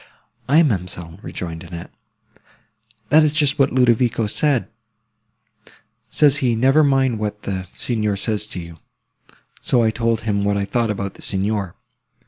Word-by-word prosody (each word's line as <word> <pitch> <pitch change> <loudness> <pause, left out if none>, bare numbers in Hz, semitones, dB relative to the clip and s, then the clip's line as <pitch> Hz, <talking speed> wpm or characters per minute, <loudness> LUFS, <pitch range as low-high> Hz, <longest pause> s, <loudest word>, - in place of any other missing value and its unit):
"Aye, 155 +4 +6
ma'amselle," 90 - -3
rejoined 85 -1 -6
Annette, 85 0 -9 1.2
"that 155 +3 +6
is 155 -1 +3
just 145 -1 +2
what 135 - +3
Ludovico 120 -2 +2
said: 135 +4 +1 1.4
says 145 +1 +4
he, 125 -5 +1
Never 135 +6 +4
mind 135 -5 +2
what 105 -1 -4
the 95 -2 -4
Signor 105 -4 -2
says 105 +1 -2
to 95 - -7
you. 85 -1 -10 0.8
So 120 -2 +2
I 110 - +2
told 115 0 0
him 105 -3 -1
what 100 0 +1
I 100 - -1
thought 115 +3 0
about 100 -2 -3
the - - -16
Signor. 100 -1 -2
110 Hz, 145 wpm, -20 LUFS, 100-130 Hz, 1.4 s, Aye